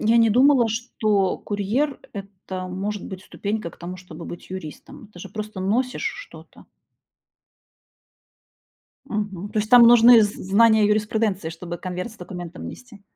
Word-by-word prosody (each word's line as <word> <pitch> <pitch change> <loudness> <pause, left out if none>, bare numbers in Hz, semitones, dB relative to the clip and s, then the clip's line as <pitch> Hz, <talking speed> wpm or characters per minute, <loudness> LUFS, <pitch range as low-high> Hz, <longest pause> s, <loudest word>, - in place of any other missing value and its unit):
Я 225 +2 +3
не 230 -1 +5
думала, 255 +1 +5
что 215 -4 0
курьер- 220 +8 -2
это 190 -2 -7
может 200 +2 -4
быть 190 -1 -8
ступенька 210 -3 -4
к - - -18
тому, 180 +1 -7
чтобы 170 -2 -11
быть 175 - -9
юристом. 185 +3 -9
Ты - - -13
же 190 +2 -9
просто 210 -1 -7
носишь 245 +7 -1 0.2
что-то. - - -16 2.4
Мгм, 205 -5 -4
то 215 - -2
есть 215 +2 -2
там 245 -1 +9
нужны 235 0 +8
з 205 0 -1
знания 220 +3 +3
о - - +5
юриспруденции, 210 -4 0
чтобы 170 +1 -7
конверт 180 +4 -5
с - - -16
документом 175 -1 -8
нести? 225 -5 -13
205 Hz, 150 wpm, -23 LUFS, 185-225 Hz, 2.4 s, там